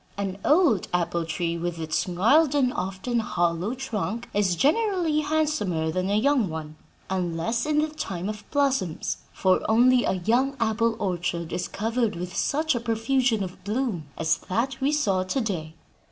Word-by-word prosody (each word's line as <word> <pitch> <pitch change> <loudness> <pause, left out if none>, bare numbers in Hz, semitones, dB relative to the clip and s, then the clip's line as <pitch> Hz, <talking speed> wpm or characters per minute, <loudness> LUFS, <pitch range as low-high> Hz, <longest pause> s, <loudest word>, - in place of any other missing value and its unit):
An 195 -1 -3
old 300 - +3
apple 170 -1 0
tree, 170 +1 -2
with 175 0 -3
its 160 +1 -1
gnarled, 265 - +3
and 255 -3 +2
often 190 +6 -2
hollow, 175 +1 0
trunk, 235 -3 -3
is 200 -3 +2
generally 335 - +2
handsomer 295 - 0
than 185 +2 -1
a 200 - +2
young 250 -3 +2
one, 155 -1 -6 0.3
unless 185 - -1
in 305 -1 +1
the 310 - -1
time 190 - -4
of 210 -1 -5
blossoms; 270 - 0
for 185 -1 +2
only 245 +3 +5
a - - +1
young 240 +9 +1
apple 230 0 +1
orchard 175 -3 -2
is 180 - -2
covered 225 +1 -1
with 180 +1 -6
such 310 +2 +1
a 240 - -1
profusion 230 0 +1
of 180 -1 -8
bloom 210 - -2
as 160 -1 +2
that 240 +7 -1
we 275 +2 +2
saw 205 -11 +1
to 185 +9 -1
day." 170 -9 -3
215 Hz, 165 wpm, -25 LUFS, 180-265 Hz, 0.3 s, only